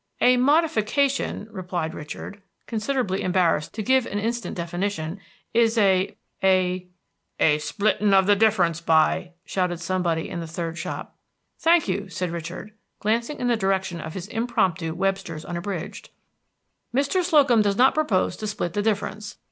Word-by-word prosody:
"A 250 - +5
modification," 275 -3 +1
replied 180 -5 -3
Richard, 175 +6 -8 0.2
considerably 220 -3 -1
embarrassed 175 -4 +1
to 215 - -3
give 260 +2 +3
an 205 - -3
instant 230 +1 -3
definition, 175 0 -3 0.3
"is 230 0 +3
a 190 -3 +3 0.3
a" 185 -1 +2 0.5
"A 150 -1 +4
splitting 210 +4 +1
of 190 -1 +5
the 205 +1 +5
difference, 200 -6 +2
by 165 +2 +2
!" 180 - -49
shouted 180 -3 -1
somebody 175 -2 -1
in 175 - -5
the 165 - -5
third 165 0 -4
shop. 180 +2 -6 0.4
"Thank 335 0 +4
you," 195 +1 -2
said 180 -1 -3
Richard, 170 +5 -6 0.3
glancing 230 +7 0
in 245 - -1
the 240 - +3
direction 190 -4 -1
of 155 - -7
his 190 0 -5
impromptu 190 -9 0
Webster's 190 -5 -2
Unabridged. 175 0 -5 0.8
"Mr. 285 +8 +1
Slocum 285 -10 +4
does 200 -1 +1
not 260 +2 +5
propose 225 -13 +1
to 215 - -4
split 175 -4 -3
the 205 - 0
difference. 210 0 -2
195 Hz, 150 wpm, -24 LUFS, 175-225 Hz, 0.8 s, A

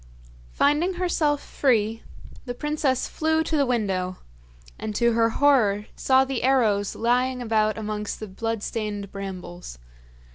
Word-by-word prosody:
Finding 300 - +2
herself 320 -5 0
free, 225 -4 +1 0.4
the 245 -1 -5
princess 295 -2 0
flew 320 0 0
to 320 - -2
the 280 -3 +2
window, 190 -6 -1 0.6
and 215 -1 -4
to 235 +1 +3
her 230 0 +3
horror 225 -6 +3
saw 265 0 +3
the 265 -2 -3
arrows 225 -6 +2
lying 250 +2 +1
about 220 -2 +1
amongst 210 -1 -4
the 215 - -6
bloodstained 210 -1 -4
brambles. 185 - -7
230 Hz, 130 wpm, -25 LUFS, 210-270 Hz, 0.6 s, to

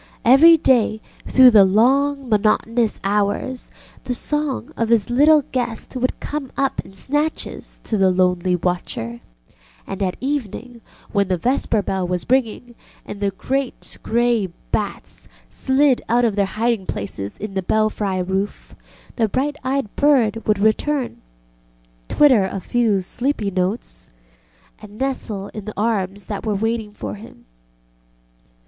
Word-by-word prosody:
Every 310 +8 +8
day, 240 -7 +2 0.3
through 260 -1 +7
the 210 -3 +7
long 270 +8 +2
monotonous 220 +1 +1
hours, 205 +5 -1 0.4
the 250 - -2
song 295 +1 -3
of 230 -1 -1
his 230 -1 +2
little 295 +4 +5
guest 240 -1 -3
would 255 0 -1
come 285 -3 -5
up 275 -1 0
in 195 - -16
snatches 295 +9 -3
to 215 - -2
the 190 -1 +4
lonely 180 0 +1
watcher, 170 -10 -3 0.7
and 195 0 -6
at 185 -2 -1
evening, 250 -3 -4 0.3
when 200 -2 +1
the 185 -1 0
vesper 230 0 0
bell 190 -2 -2
was 180 -1 -2
ringing 245 -1 0 0.3
and 205 - -8
the 200 -1 +1
great 260 +7 -4
grey 235 -3 +1 0.2
bats 205 -2 -4 0.2
slid 265 -1 +2
out 240 +1 +3
of 220 -4 0
their 200 -1 +1
hiding 220 -1 -1
places 100 0 -4
in 210 -1 -6
the 190 - -1
belfry 205 -2 0
roof, 190 +2 -3 0.4
the 225 -3 +1
bright 280 +6 -1
eyed 260 -4 -2
bird 240 -7 +2
would 210 -1 +3
return, 240 +6 0 0.9
twitter 255 -10 +4
a 195 +1 -4
few 220 -2 +1
sleepy 230 +1 -2
notes, 185 +5 -3 0.7
and 210 0 -12
nestle 225 -7 -3
into 210 -2 -8
the 215 - -5
arms 200 -3 -1
that 205 0 -5
were 215 -2 -1
waiting 225 +1 -2
for 210 - -6
him. 210 - -13
220 Hz, 140 wpm, -20 LUFS, 195-255 Hz, 0.9 s, Every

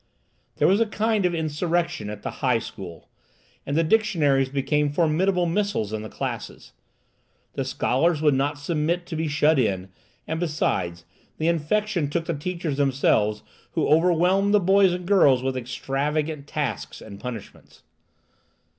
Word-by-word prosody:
There - - +3
was 200 +4 +3
a 230 - +3
kind 215 -2 +1
of 175 - -2
insurrection 160 - -1
at 105 -1 -8
the - - -3
high 125 -3 +3
school, 90 -7 -9 0.6
and 140 +2 -1
the 165 - +4
dictionaries 155 -9 +2
became 145 +2 0
formidable 175 +4 +2
missiles 170 - -1
in 110 - -3
the 110 - -7
classes. - - -6 0.8
The - - -2
scholars 155 +5 +1
would 150 -2 +3
not 140 +2 0
submit 165 +3 -1
to 170 - -6
be 160 0 -1
shut 150 0 +3
in, 95 -5 0 0.4
and, 160 0 -2
besides, 90 - -1 0.3
the 160 - -1
infection 170 +1 0
took 165 +2 -2
the 170 - -1
teachers 165 -1 -3
themselves, 130 -7 +1 0.3
who - - +1
overwhelmed 180 +5 +3
the - - +6
boys 195 0 +4
and 180 0 -4
girls 145 -10 +4
with 135 0 -1
extravagant 140 +4 -2
tasks 150 -3 -3
and 100 -2 -11
punishments. 120 -3 -9
155 Hz, 150 wpm, -24 LUFS, 135-175 Hz, 0.8 s, the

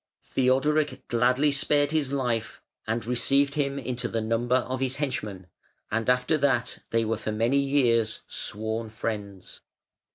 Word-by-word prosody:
Theodoric 145 +4 +1
gladly 125 +5 +3
spared 145 +1 +2
his 150 -4 0
life, 125 -5 -2 0.3
and 115 +1 -1
received 135 +4 +2
him 140 -1 -1
into 125 -2 -3
the 115 - -2
number 115 +3 0
of 130 0 -1
his 130 0 0
henchmen, 110 -10 -4 0.5
and 115 +2 0
after 125 +5 +2
that 135 -4 +1
they 115 0 +1
were 110 0 -1
for 110 - -4
many 115 +6 +2
years 120 -6 +2
sworn 110 +1 -3
friends. 105 -3 -5
125 Hz, 140 wpm, -26 LUFS, 115-140 Hz, 0.5 s, gladly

